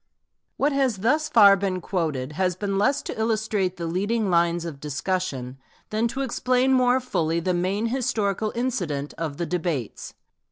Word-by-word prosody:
What 285 +2 +2
has 265 -6 +1
thus 300 +10 +1
far 205 -7 +7
been 190 -1 -2
quoted 155 -8 -2
has 180 +3 0
been 195 +1 -2
less 275 +7 +2
to - - -6
illustrate 215 -4 0
the 170 - -4
leading 200 +5 0
lines 170 0 +2
of 155 -5 -6
discussion, 140 -4 -3 0.3
than 220 +2 +1
to 265 +4 -4
explain 255 +1 +1
more 255 0 +4
fully 170 -10 -1
the 180 +2 0
main 185 +5 0
historical 220 -4 -1
incident 175 - -2
of 155 -4 -3
the 170 - -2
debates. 165 - -3
195 Hz, 160 wpm, -24 LUFS, 170-230 Hz, 0.3 s, far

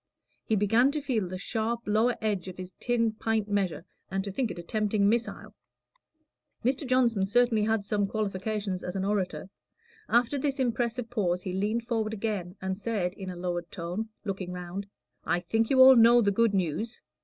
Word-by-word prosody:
He 220 - 0
began 225 +6 +4
to 305 - -1
feel 245 -9 -1
the 185 +1 -5
sharp 225 +4 -2
lower 220 +4 +2
edge 205 -4 -1
of 185 - -8
his 185 0 -7
tin 230 -2 +1
pint 220 -1 -1
measure, 190 -6 -1 0.2
and 195 0 -1
to 200 - -4
think 240 +3 -1
it - - -6
a 175 - -6
tempting 210 +1 +1
missile. 230 +2 -1 1.1
Mr. 265 +2 0
Johnson 235 -6 +2
certainly 240 0 +3
had 220 -2 0
some 205 -1 0
qualifications 200 -2 -2
as 180 - -5
an 190 0 -1
orator. 195 -2 -1 0.6
After 240 +4 +2
this 275 0 -1
impressive 240 -1 -1
pause 180 -6 0
he 185 - -4
leaned 210 +5 0
forward 220 -2 -1
again, 200 -4 -3
and 190 0 -3
said, 205 -5 -1
in 190 -1 -7
a 180 - -6
lowered 175 -1 -3
tone, 180 +6 -4 0.2
looking 190 -3 -4
round 180 +2 -6 0.4
"I 175 - +1
think 225 +5 0
you 265 - +3
all 260 0 +10
know 235 0 +7
the 200 - +3
good 225 0 +2
news." 190 +6 -2
210 Hz, 185 wpm, -28 LUFS, 190-230 Hz, 1.1 s, all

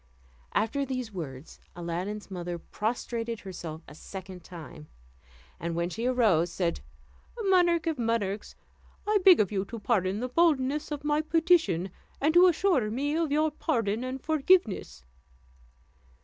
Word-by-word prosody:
After 225 +7 +1
these 255 -5 -4
words, 150 -5 -7 0.2
Aladdin's 180 +5 -4
mother 175 -1 -4
prostrated 230 +4 -3
herself 165 -4 -7
a 145 - -11
second 185 +2 -9
time; 165 -3 -10 0.7
and 170 0 -3
when 170 +1 -1
she 230 +6 -2
arose, 210 -10 +3
said, 170 -1 -1 0.6
"Monarch 350 -4 +3
of 320 -5 -1
monarchs, 220 -3 -1 0.5
I 420 0 +3
beg 370 -3 +8
of 205 -2 +2
you 195 -2 0
to 230 - -7
pardon 205 -3 0
the 250 - -2
boldness 295 -1 +2
of 295 -2 -5
my 295 0 +2
petition, 320 - +2 0.3
and 305 +3 +2
to 355 +2 +8
assure 340 - +2
me 280 +7 -1
of 325 -3 0
your 310 +1 +2
pardon 230 -7 -1
and 255 +1 -4
forgiveness." 310 - +1
230 Hz, 140 wpm, -28 LUFS, 185-300 Hz, 0.7 s, beg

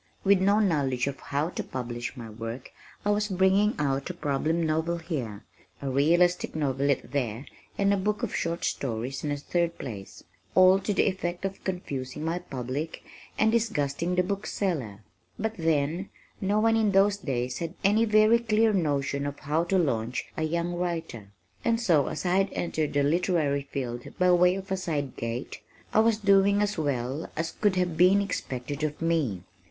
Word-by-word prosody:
With 195 -1 +4
no 200 +2 +4
knowledge 140 - +1
of 140 0 -4
how 145 +3 -2
to - - -4
publish 120 0 -5
my 115 -2 -7
work 115 +3 -7 0.3
I 205 - +3
was 210 0 +1
bringing 190 +2 +3
out 140 0 -1
a 180 - -5
problem 160 +2 0
novel 160 +2 0
here, 130 - -5 0.4
a 135 -1 -3
realistic 170 +7 +2
novelette 140 -3 0
there 125 -2 -2 0.3
and 200 0 +3
a - - +2
book 210 +2 -1
of - - -2
short 170 0 -1
stories 125 +1 -3
in 150 - -1
a 145 - -1
third 170 +3 -1
place, 100 -7 -8 0.3
all 185 +1 +7
to 205 - -2
the 200 - +3
effect 180 -1 -2
of 195 0 -5
confusing 150 -6 -4
my 165 +2 -1
public 135 +3 -5 0.3
and 220 0 +3
disgusting 180 -7 0
the 180 - +3
book 200 +2 -3
seller. 130 - -2 0.3
But 220 +1 -2
then, 165 +2 0 0.3
no 205 +2 +2
one 225 +1 +3
in 215 -3 +2
those 200 +1 +4
days 125 -8 -3
had 170 +1 -4
any 210 +3 +4
very 215 +1 +5
clear 220 -1 +2
notion 145 -5 0
of 145 0 -5
how 155 +3 0
to 190 +2 +1
launch 125 -8 0
a - - -3
young 170 +2 -1
writer, 170 - -3 0.4
and 230 -1 +2
so 170 - +3
(as - - -4
I 180 +1 +2
had 195 0 +2
entered 155 -3 -2
the 145 0 +2
literary 150 -3 +1
field 120 -3 -4
by 180 0 +4
way 180 +1 +5
of 195 0 -7
a 190 - +1
side 150 -7 -3
gate) 115 +3 -4 0.3
I - - +5
was 225 0 +4
doing 200 -1 +4
as 210 0 -1
well 140 -1 -2
as 165 +1 -1
could 205 -3 +1
have 180 -3 0
been 185 +4 +6
expected 145 -7 -4
of 150 -1 -2
me. 155 - 0
165 Hz, 180 wpm, -27 LUFS, 140-195 Hz, 0.4 s, all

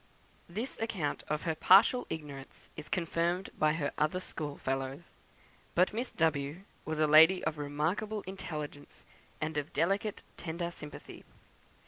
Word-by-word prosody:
This 220 +9 -4
account 190 -10 -2
of 150 +1 -1
her 165 - 0
partial 195 +10 +6
ignorance 145 -4 -8
is 155 - -8
confirmed 175 +1 0
by 155 -1 +4
her 145 -3 -1
other 155 +4 +2
school 150 -5 -5
fellows. 135 +4 -3 0.6
But 180 +3 +4
Miss 240 +3 -2
W 155 0 0 0.2
was 155 -1 -2
a 155 - +5
lady 160 +5 +7
of 155 - -2
remarkable 160 +9 -1
intelligence 150 - -7 0.3
and 155 0 -1
of 145 - -7
delicate 195 +4 0
tender 170 +1 -3
sympathy. 150 -3 -10
160 Hz, 135 wpm, -32 LUFS, 150-185 Hz, 0.6 s, lady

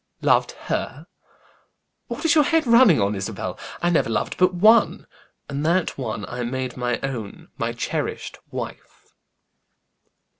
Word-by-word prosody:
"Loved - - +3
her! - - -3 1.0
What - - -6
is 325 - +5
your 305 -2 +5
head 325 -1 +2
running 235 - +6
on, 100 +1 +1
Isabel? 95 -2 -5 0.2
I 175 - +3
never 160 - +2
loved 115 - -1
but 185 0 +3
one; 215 +6 +4 0.4
and 140 +1 -4
that 170 +3 +1
one 110 -5 -4
I 120 +6 -6
made 130 +1 -3
my 120 -1 -1
own, 120 -7 -6
my 115 0 -1
cherished 115 - -4
wife." - - -8
130 Hz, 140 wpm, -23 LUFS, 115-185 Hz, 1.0 s, running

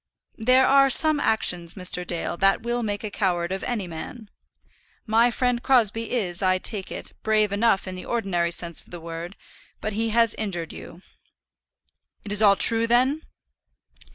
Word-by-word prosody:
"There 255 +3 +4
are 275 0 +4
some 310 +3 +5
actions, 180 -9 +1
Mr. 180 -2 +2
Dale, 175 -1 -4
that 195 +3 +2
will 240 +1 -2
make 205 -2 -4
a 210 - -5
coward 175 -3 -1
of 190 - -4
any 230 -6 -3
man. 180 +7 -9 0.7
My 230 +1 +3
friend 245 0 -1
Crosbie 230 -4 +1
is, 185 -8 -2
I 185 -1 +2
take 195 0 -2
it, - - -8
brave 215 -2 +1
enough 205 -1 +1
in 185 - -5
the 185 - -8
ordinary 190 -7 -1
sense 170 -1 -2
of - - -23
the 175 - -9
word, 165 +3 -8 0.4
but 215 - -4
he 225 +2 -1
has 230 0 +2
injured 175 -6 -4
you." 175 +3 -12 1.2
"It 205 - -8
is 205 +1 +2
all 200 -2 +6
true, 230 +3 +4
then?" 255 +6 +2
210 Hz, 170 wpm, -23 LUFS, 180-235 Hz, 1.2 s, all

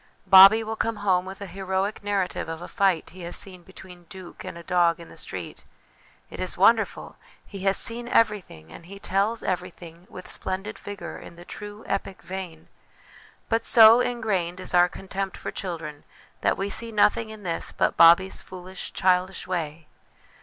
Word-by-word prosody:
Bobbie 195 +4 +9
will 220 0 -4
come 225 0 -1
home 185 -3 +1
with 190 +1 -9
a - - -4
heroic 190 +2 -3
narrative 200 -5 -2
of 165 0 -5
a 175 - -8
fight 195 -6 0
he 185 +2 -12
has 175 0 -6
seen 190 -3 -3
between 180 -1 -14
'Duke' 185 +1 -11
and - - -7
a 170 - -10
dog 170 -1 +2
in 170 - -12
the - - -14
street. - - -7 0.7
It - - -9
is - - -2
wonderful! - - +2 0.3
He 200 - -9
has 195 0 +2
seen 235 +1 -1
everything, 205 - 0
and 165 - -12
he 200 +2 -10
tells 200 +4 -1
everything 180 -1 -5
with 185 - -10
splendid 195 +3 -4
vigour 205 0 -8
in - - -12
the 175 +1 -13
true 210 +2 -9
epic 195 -1 -4
vein; 180 -4 -7 0.8
but 225 0 0
so 225 0 +7
ingrained 215 -8 -1
is 185 - -6
our 175 0 +5
contempt 195 +1 -5
for - - -6
children 160 -5 -6 0.4
that - - +1
we 195 - -2
see 230 +3 -3
nothing 215 +1 +2
in 215 -1 -10
this 170 -2 -3
but - - 0
Bobbie's 170 +3 +5
foolish 185 0 -9
childish 185 0 +1
way 160 -3 -4
190 Hz, 175 wpm, -25 LUFS, 175-205 Hz, 0.8 s, Bobbie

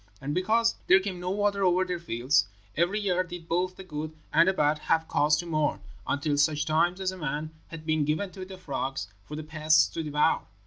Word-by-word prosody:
And 140 +2 -3
because 225 +6 +2
there 190 - +7
came 190 -2 -4
no 180 +1 -3
water 200 0 +1
over 185 0 +3
their 180 -1 -3
fields, 125 - +1 0.3
every 175 +6 +1
year 185 -3 +1
did 175 -2 -9
both 180 +2 0
the 190 - -9
good 155 -3 -6 0.2
and 165 +3 +6
the 190 - +4
bad 150 -3 +2
have 160 +1 +1
cause 150 +1 +3
to 175 - -3
mourn, 155 -3 0 0.3
until 145 0 0
such 150 0 +2
times 175 +4 +2
as 190 -1 -1
a 185 - -9
man 150 +1 -3 0.2
had 160 -1 -9
been 155 -1 +1
given 155 +7 -1
to 190 -1 -8
the 190 0 -9
frogs 135 -6 -4 0.2
for 150 - -7
the 155 - -5
pests 155 0 +3
to 165 - -4
devour. 150 +1 +2
165 Hz, 220 wpm, -28 LUFS, 150-185 Hz, 0.3 s, there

